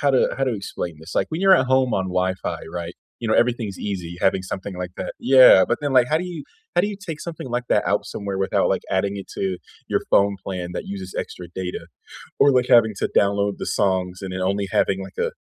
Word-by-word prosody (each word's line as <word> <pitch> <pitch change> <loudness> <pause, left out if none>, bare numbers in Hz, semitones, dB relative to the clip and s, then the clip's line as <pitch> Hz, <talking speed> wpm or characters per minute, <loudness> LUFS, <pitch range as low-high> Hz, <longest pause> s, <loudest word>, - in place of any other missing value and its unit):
how 140 -1 +3
to 130 - +3
how 135 - +2
to 130 -3 0
explain 95 -4 -5
this? 80 +2 -10
Like, - - +1
when 160 +2 -3
you're 195 0 +7
at 130 - +1
home 130 -2 +2
on 95 - 0
Wi-Fi, 95 +1 -2
right? 85 0 -5 0.2
You 120 - -5
know, - - +3
everything's 115 -5 +1
easy 90 -4 -5
having 95 -1 +2
something 95 0 -6
like 90 0 -4
that - - -4
Yeah, 130 -7 +7
but 120 - 0
then, 145 -2 -2
like, 125 -1 +6
how 155 - +3
do 180 - -4
you 170 -5 -7 0.3
how 175 - +4
do 205 - +1
you 205 - -5
take 155 -2 -5
something 165 -6 -7
like 120 0 -1
that - - +3
out - - +1
somewhere 100 -1 -5
without, 95 - +1
like, - - 0
adding 100 +1 0
it 100 - -7
to 95 -2 -1 0.3
your - - 0
phone 100 0 +4
plan 90 -2 -4
that - - -4
uses 95 -1 -7
extra 90 - -6
data 90 -3 -5 0.5
or, 140 - +5
like, 125 -1 +3
having 115 -3 +6
to - - 0
download 100 0 +3
the - - -4
songs 95 -2 0
and 95 -1 -6
then 95 - -4
only 100 +1 0
having, 95 0 +1
like, 95 - -11
a - - 0
100 Hz, 245 wpm, -22 LUFS, 95-130 Hz, 0.5 s, you're